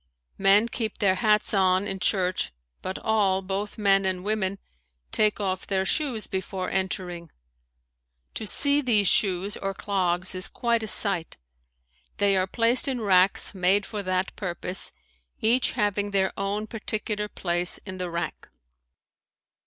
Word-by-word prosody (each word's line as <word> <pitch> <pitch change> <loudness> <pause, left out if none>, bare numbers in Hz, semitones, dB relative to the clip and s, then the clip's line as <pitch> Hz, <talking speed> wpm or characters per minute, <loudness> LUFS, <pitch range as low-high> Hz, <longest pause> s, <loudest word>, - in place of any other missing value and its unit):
Men 200 +3 +5
keep 225 -3 -4
their 195 -2 +3
hats 215 +1 +2
on 190 -1 +2
in 195 -1 -4
church, 185 -1 0 0.3
but 190 - -4
all, 195 -3 +1
both 195 +2 -4
men 195 -2 +3
and 185 -1 -1
women, 200 -2 -1 0.5
take 215 -1 +2
off 190 -2 -2
their 190 -1 0
shoes 250 -3 -1
before 190 0 -4
entering. 180 -3 -3 1.0
To 220 - -5
see 285 +7 +3
these 215 -7 +2
shoes, 195 0 +1
or 195 0 -4
clogs, 185 -3 -1
is 185 0 -1
quite 235 -1 -1
a 220 - -4
sight. 195 -6 +3 0.8
They 200 -1 +3
are 185 0 +1
placed 235 +6 +2
in 260 -3 -1
racks 190 -3 +3
made 190 +2 +2
for 210 -2 -5
that 185 0 -2
purpose, 180 -1 -2 0.5
each 240 +4 +2
having 205 0 0
their 195 -1 +1
own 200 +2 -2
particular 215 -1 -3
place 175 -3 0
in 190 -2 -7
the 180 -1 -3
rack. 170 -2 -5
195 Hz, 145 wpm, -25 LUFS, 185-210 Hz, 1.0 s, Men